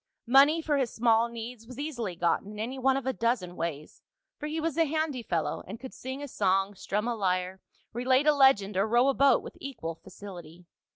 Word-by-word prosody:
Money 280 +6 +5
for 295 -2 +1
his 260 -4 0
small 230 0 +3
needs 230 0 -8
was 250 0 -10
easily 240 - -4
gotten 175 +4 0
in - - -10
any 245 +5 -4
one 265 +1 +3
of 270 - -4
a 265 - 0
dozen 230 -7 -1
ways, 155 -3 -5 0.4
for 300 - -4
he 315 +2 -3
was 320 -2 -2
a 330 - +3
handy 310 -3 -1
fellow, 170 -8 -2
and 210 +5 -7
could 260 - -9
sing 260 +2 -6
a - - -5
song, 195 -4 +1
strum 210 +3 -2
a 240 - 0
lyre, 185 -2 -1 0.3
relate 255 +4 +2
a 300 - +6
legend 265 -8 +4
or 195 +3 +2
row 240 +4 +4
a - - +2
boat 275 +1 +4
with - - -9
equal 225 -12 -5
facility. 175 -2 -12
235 Hz, 215 wpm, -28 LUFS, 195-270 Hz, 0.4 s, a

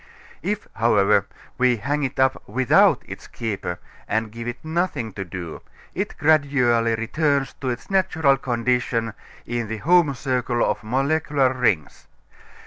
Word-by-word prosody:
If, 210 +4 -3
however, 105 -4 +3 0.3
we 125 -1 +3
hang 145 +8 -1
it 135 -2 -3
up 130 0 +2
without 130 -1 +4
its - - -9
"keeper," 100 -6 -4 0.3
and 110 0 -1
give 115 +1 -7
it 120 0 -4
nothing 160 - -2
to 95 - -4
do, 85 -3 -7 0.3
it - - -4
gradually 130 -7 +3
returns 140 +4 0
to 130 - -1
its 125 +9 -5
natural 160 -7 +3
condition 120 -2 -1 0.3
in 120 -1 -3
the 110 +1 -4
home 160 +2 +3
circle 125 -2 0
of - - -1
molecular 135 +2 +1
rings. 110 - -1
125 Hz, 135 wpm, -23 LUFS, 115-140 Hz, 0.3 s, without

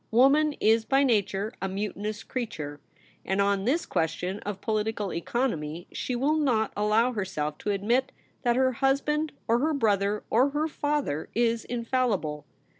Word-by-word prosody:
Woman 280 +6 +4
is 225 -3 +3
by 270 +4 +3
nature 210 -3 +1
a 190 - -1
mutinous 205 +2 -4
creature, 155 - -5 0.4
and 190 +1 -1
on 200 0 +2
this 295 +8 +1
question 180 +4 -1
of 205 -2 -5
political 215 -2 -1
economy 170 - -2
she 250 - -3
will 285 +6 +2
not 245 -8 +1
allow 215 +4 +3
herself 185 -9 -3
to - - -3
admit 225 +6 +1 0.3
that 240 -2 +2
her 260 0 +3
husband 285 +4 +1 0.2
or 230 +1 +3
her 310 +3 +1
brother 210 -4 +1
or 250 +5 +4
her 295 +2 0
father 290 - -2
is 230 0 +2
infallible. 230 - -1
225 Hz, 150 wpm, -27 LUFS, 200-260 Hz, 0.4 s, Woman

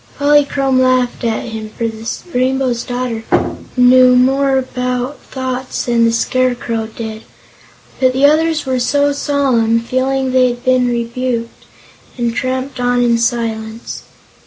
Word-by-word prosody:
Polychrome 285 -2 +2
laughed 255 -1 +1
at 225 -2 -1
him, 220 -1 -6
for 230 +2 -3
the 225 0 -7 0.3
Rainbow's 255 -1 0
Daughter 245 -2 -3 0.5
knew 250 0 +6
more 270 +2 +3
about 250 +1 -3
thoughts 260 -1 -4
than 235 -1 +2
the 230 - +3
Scarecrow 235 -1 -1
did. 220 -1 -7 0.8
But 255 -1 +3
the 265 +2 +3
others 310 +1 +2
were 260 -1 -1
solemn, 280 -4 +1
feeling 260 +2 -1
they 255 0 +4
had 245 +1 -7
been 255 -1 +3
rebuked, 235 0 -3 0.5
and 235 -1 -1
tramped 260 +2 -3
on 245 0 +1
in 235 -1 +2
silence. 230 -1 -3
250 Hz, 130 wpm, -16 LUFS, 235-260 Hz, 0.8 s, knew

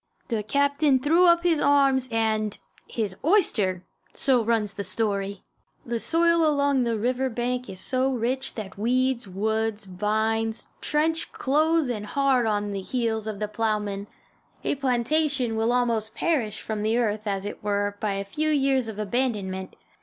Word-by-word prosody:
The 225 -3 0
captain 280 +4 +2
threw 330 +7 +4
up 340 0 +5
his 330 -4 +2
arms 275 -2 +3
and 220 -2 0 0.3
his 205 -5 -3
oyster! 210 - +2 0.3
so 255 -4 +2
runs 220 -3 0
the 200 - -4
story. 200 0 -2 0.4
The 235 -1 -2
soil 335 +4 +3
along 285 -4 +2
the 230 -1 0
river 250 +4 0
bank 250 +1 -2
is 185 - -6
so 260 +5 +1
rich 255 +2 -2
that 200 -3 -7
weeds, 250 +1 +1
woods, 220 +2 -1
vines, 220 +4 -1
trench 320 +2 0
close 310 +2 +2
and 215 -4 -3
hard 265 -2 +2
on 205 -1 0
the 195 -1 -3
heels 220 0 -2
of 215 -2 -4
the 210 +1 -2
plowman. 210 -2 -2 0.6
A - - +1
plantation 265 -1 0
will 225 +1 +1
almost 230 -3 0
perish 245 -11 0
from 215 -1 -4
the 220 +2 +1
earth, 215 -2 -1
as 195 -1 -1
it 205 - -7
were, 205 0 0
by 210 -2 -1
a 195 0 -3
few 305 +10 -1
years 270 -4 +2
of 220 -2 -6
abandonment. 205 -4 -2
230 Hz, 160 wpm, -25 LUFS, 210-270 Hz, 0.6 s, up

